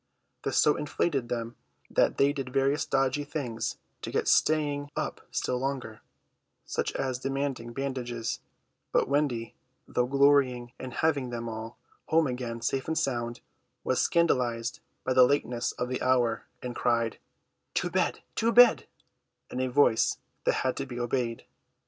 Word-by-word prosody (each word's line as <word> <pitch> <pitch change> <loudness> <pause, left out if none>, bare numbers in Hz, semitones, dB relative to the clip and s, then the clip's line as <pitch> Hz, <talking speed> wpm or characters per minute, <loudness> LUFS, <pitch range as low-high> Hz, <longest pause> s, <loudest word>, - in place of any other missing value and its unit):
This - - -1
so 150 - +5
inflated 140 -3 -1
them 115 -1 -3 0.3
that - - +2
they 140 +1 +4
did 135 -3 -4
various 140 +3 +2
dodgy 135 0 +1
things 140 -6 -3 0.2
to - - -5
get - - -1
staying 145 -2 +2
up - - -3
still 125 - -1
longer, 130 -5 -3 0.6
such - - -1
as 130 -2 -2
demanding 135 -3 -2
bandages; 120 -3 -3 0.5
but - - +3
Wendy, 130 -5 0 0.3
though 125 0 +1
glorying 135 -3 +3
in 130 - -5
having 140 -1 0
them 115 -1 -4
all 110 +1 -6 0.3
home 160 0 +4
again 125 -3 -3
safe 130 +2 -1
and 160 0 -1
sound, 120 -3 -1 0.4
was - - +1
scandalised 125 -8 +1 0.2
by 130 - +1
the 130 - +6
lateness 125 -2 +2
of 125 - -3
the 125 0 -3
hour, 125 -3 +2 0.2
and 125 -1 -4
cried, 115 -2 +1 0.6
"To - - 0
bed, - - 0
to 230 +1 +3
bed," 245 -1 +7 0.6
in 125 - -3
a 130 - +1
voice 120 -3 +3 0.3
that - - +4
had 130 - 0
to 135 - -3
be 120 -1 -6
obeyed. 120 -1 -1
130 Hz, 150 wpm, -29 LUFS, 120-140 Hz, 0.6 s, bed